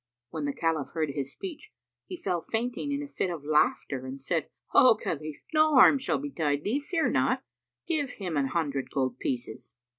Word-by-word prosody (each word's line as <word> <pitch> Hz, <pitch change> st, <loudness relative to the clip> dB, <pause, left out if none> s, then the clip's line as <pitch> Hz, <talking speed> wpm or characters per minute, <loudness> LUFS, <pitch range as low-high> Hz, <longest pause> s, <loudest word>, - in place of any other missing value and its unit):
When 155 Hz, -3 st, -3 dB
the 145 Hz, -, -1 dB
Caliph 160 Hz, -3 st, -1 dB
heard 155 Hz, -3 st, 0 dB
his 140 Hz, -1 st, -3 dB
speech, 385 Hz, +3 st, -8 dB, 0.3 s
he 365 Hz, -, -6 dB
fell 180 Hz, -, -1 dB
fainting 245 Hz, -, -2 dB
in 285 Hz, +1 st, -1 dB
a -, -, -6 dB
fit 190 Hz, -, -2 dB
of 165 Hz, -5 st, -5 dB
laughter 150 Hz, -3 st, +1 dB
and 135 Hz, +1 st, -6 dB
said, 160 Hz, +3 st, -1 dB, 0.2 s
"O 255 Hz, -4 st, +7 dB
Khalif, 155 Hz, -5 st, -4 dB
no 310 Hz, -1 st, +4 dB
harm 265 Hz, +2 st, +8 dB
shall 265 Hz, -, 0 dB
betide 155 Hz, -, -1 dB
thee: 240 Hz, +8 st, 0 dB
fear 320 Hz, 0 st, 0 dB
not. 130 Hz, -, +1 dB, 0.4 s
Give 305 Hz, -5 st, 0 dB
him 180 Hz, -8 st, -5 dB
an 140 Hz, -2 st, +2 dB
hundred 140 Hz, -2 st, -1 dB
gold 130 Hz, -3 st, -1 dB
pieces." 120 Hz, -2 st, -4 dB
165 Hz, 185 wpm, -28 LUFS, -, 0.4 s, harm